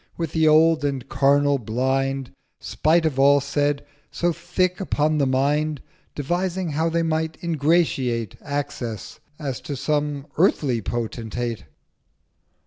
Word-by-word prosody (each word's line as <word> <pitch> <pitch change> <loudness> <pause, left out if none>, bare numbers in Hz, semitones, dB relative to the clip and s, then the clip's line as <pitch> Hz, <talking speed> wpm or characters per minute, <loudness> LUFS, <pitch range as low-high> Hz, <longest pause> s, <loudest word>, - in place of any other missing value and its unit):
with 165 -3 -3
the 160 -1 +2
old 155 0 +5
and 140 -3 -2
carnal 140 0 +3
Blind, 130 +3 -1 0.3
Spite 165 +1 +1
of 140 -4 0
all 140 +1 +6
said, 145 +1 -1 0.2
so 175 0 0
thick 180 +2 -1
upon 155 -4 +1
the 140 - +2
Mind, 145 +3 +1 0.4
Devising 175 +4 -1
how 160 +3 0
they 165 0 0
might 160 0 -1
ingratiate 145 - +1
Access, 140 -5 -5 0.2
as 140 -5 -4
to 145 - -5
some 145 0 -1
earthly 140 - +2
Potentate. 115 +1 -4
145 Hz, 125 wpm, -23 LUFS, 135-160 Hz, 0.4 s, all